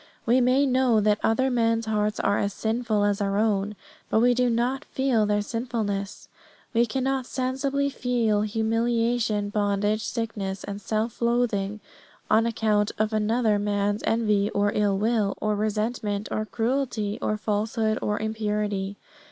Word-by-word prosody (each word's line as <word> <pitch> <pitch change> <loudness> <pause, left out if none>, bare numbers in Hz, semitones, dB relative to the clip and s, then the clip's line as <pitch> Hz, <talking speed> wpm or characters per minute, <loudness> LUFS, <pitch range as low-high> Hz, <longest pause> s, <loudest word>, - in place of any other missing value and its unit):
We 245 +2 +4
may 255 +3 +3
know 255 -4 +3
that 210 0 +2
other 260 +4 +2
men's 230 -1 +1
hearts 210 -1 0
are 200 +1 +1
as 200 0 -1
sinful 220 -2 0
as 205 0 +1
our 200 0 0
own, 210 -1 +1 0.3
but - - +3
we 245 +2 +4
do 250 0 +2
not 245 +4 0
feel 250 -6 +1
their 205 0 +1
sinfulness. 215 -4 -3 0.5
We 235 +1 +3
cannot 265 +2 -1
sensibly 270 +2 -1
feel 235 -5 +1
humiliation, 225 0 0
bondage, 205 +1 0
sickness, 205 -5 -3
and 200 0 -6
self 220 +3 -2
loathing 225 -4 0 0.5
on 225 +1 +4
account 215 -2 +1
of 215 +1 0
another 215 0 +2
man's 205 0 0
envy, 210 -3 +2
or 205 0 +2
ill 205 -2 +1
will, 215 -1 +1
or 215 0 0
resentment, 210 0 -2
or 215 0 -2
cruelty, 230 -4 -1
or 215 - 0
falsehood, 215 +1 -1
or 210 0 -1
impurity. 210 -2 -2
215 Hz, 145 wpm, -25 LUFS, 205-235 Hz, 0.5 s, We